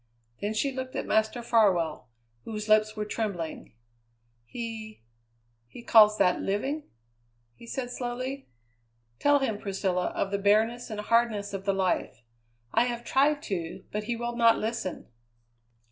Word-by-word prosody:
Then 210 +2 -2
she 275 +5 +1
looked 260 0 -6
at - - -2
Master 220 +2 +1
Farwell, 185 - +2 0.3
whose 215 -1 -5
lips 215 0 +4
were 210 -1 -3
trembling. 200 - -4 0.7
"He 220 - -7 0.6
he 235 - -12
calls 215 -2 +7
that 180 - +3
living!" 270 +10 -2 0.6
he 235 - -15
said 245 0 -4
slowly. 255 +3 -4 0.7
"Tell 290 0 +5
him, 240 -7 -1
Priscilla, 190 -3 -1
of 195 - -1
the 200 - 0
bareness 220 +5 +2
and 215 -2 -5
hardness 215 -2 +1
of 195 0 -5
the 195 - +2
life. 190 -9 -1 0.5
I - - +4
have 240 -1 -3
tried 285 +4 +2
to, 175 -4 -4
but 210 0 -3
he 240 +1 -1
will 240 +1 -4
not 230 -1 +5
listen." 220 -4 -3
220 Hz, 145 wpm, -28 LUFS, 200-240 Hz, 0.7 s, calls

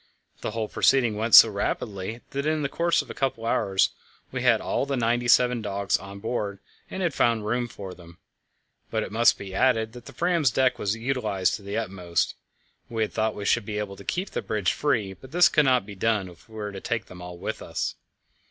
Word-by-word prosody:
The - - -3
whole 110 0 -3
proceeding 120 -1 +3
went 110 +2 +4
so - - +11
rapidly 100 +1 -3
that 140 +2 -2
in 155 -1 0
the 140 - -1
course 170 +3 +1
of - - -10
a - - -5
couple 130 -4 -2
of 115 - +1
hours 95 -1 +2 0.4
we - - -3
had - - +4
all 140 - -1
the 140 -1 -1
ninety 120 +1 +1
seven 125 -1 +4
dogs 100 -2 -1
on 100 0 -5
board 105 -2 -3 0.3
and 190 - -4
had 170 -4 0
found 115 -4 +2
room 120 +3 0
for 95 -5 -8
them; 85 -1 -15 0.7
but - - -1
it - - -7
must 115 +2 +4
be 95 -1 -8
added 115 -1 +2
that 120 -1 -11
the - - -10
Fram's 170 -5 +2
deck 125 0 +1
was 100 +1 0
utilized 110 -6 0
to - - -16
the 100 +1 -4
utmost. 95 -6 -1 0.6
We 115 -1 0
had 105 - -4
thought 110 -1 0
we 100 - -6
should 120 +2 +2
be 105 0 -4
able 105 -2 -4
to - - -12
keep 185 +2 -3
the - - -2
bridge 100 -5 0
free, 115 -10 0
but 125 +8 -15
this 175 +2 +6
could 150 - +3
not 130 -5 +3
be 105 - -9
done 100 -1 0
if 90 +5 -18
we 110 - -14
were 105 -1 -4
to 95 -1 -8
take 115 -2 -2
them 90 -1 -12
all 90 0 -8
with 100 +5 -5
us. 80 0 -3
110 Hz, 230 wpm, -26 LUFS, 100-125 Hz, 0.7 s, so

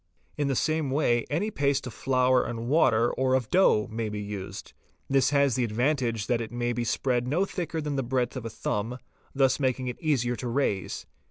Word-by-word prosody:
In 145 -1 0
the 135 - 0
same 155 +1 0
way 120 -4 +2
any 190 +9 -1
paste 140 -5 0
of 125 - -6
flour 130 -1 +2
and 115 0 -4
water 120 -5 +3
or 130 0 +2
of 125 -4 -1
dough 180 - +4
may 110 0 -2
be 105 0 -4
used. 100 -2 -7 0.3
This 135 -1 +3
has 140 -2 +3
the 125 - +1
advantage 120 -1 0
that 120 0 0
it 115 - -6
may 120 0 -1
be 120 0 -2
spread 125 0 0
no 170 +9 +1
thicker 170 -4 -4
than 150 -2 -3
the - - +1
breadth 125 0 -1
of 130 - -3
the 115 - -5
thumb, 110 +2 -3 0.4
thus 135 0 +3
making 130 -2 0
it 125 - -7
easier 125 -6 +1
to 125 - -4
raise. 115 - -1
125 Hz, 205 wpm, -27 LUFS, 120-140 Hz, 0.4 s, dough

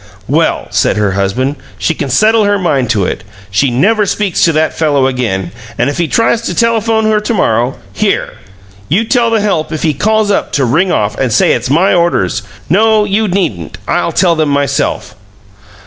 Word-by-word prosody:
"Well," - - 0
said - - +1
her 105 -2 +1
husband, 115 +9 -1 0.2
"she 165 - 0
can 145 -3 -4
settle 215 - +3
her 205 0 +2
mind 140 -9 0
to 105 -6 +1
it. - - -4 0.3
She 130 +8 +2
never 205 - +1
speaks 200 -3 0
to 165 - +3
that 155 +1 0
fellow 145 -4 +1
again, 115 -9 -2 0.3
and 145 - +1
if 145 - -6
he 170 - +1
tries 230 +5 +1
to - - -4
telephone 225 -1 +1
her 215 -1 +2
to 210 +2 -2
morrow 120 - +1 0.2
Here! - - -1 0.6
You 195 +9 +2
tell 235 0 +1
the 225 -2 +1
help 185 -7 -1
if 155 - -4
he 155 -2 +1
calls 215 +5 +1
up - - -1
to 135 - +1
ring 165 +10 +1
off 105 0 0
and 130 -3 0
say - - +3
it's 120 +1 -1
my 170 +8 +3
orders. 170 - +1 0.3
No, 215 +5 +3
you 210 +1 0
needn't. 165 - -2
I'll - - 0
tell 170 -3 +2
'em 155 - +1
myself." 140 0 -1
165 Hz, 195 wpm, -12 LUFS, 130-210 Hz, 0.6 s, settle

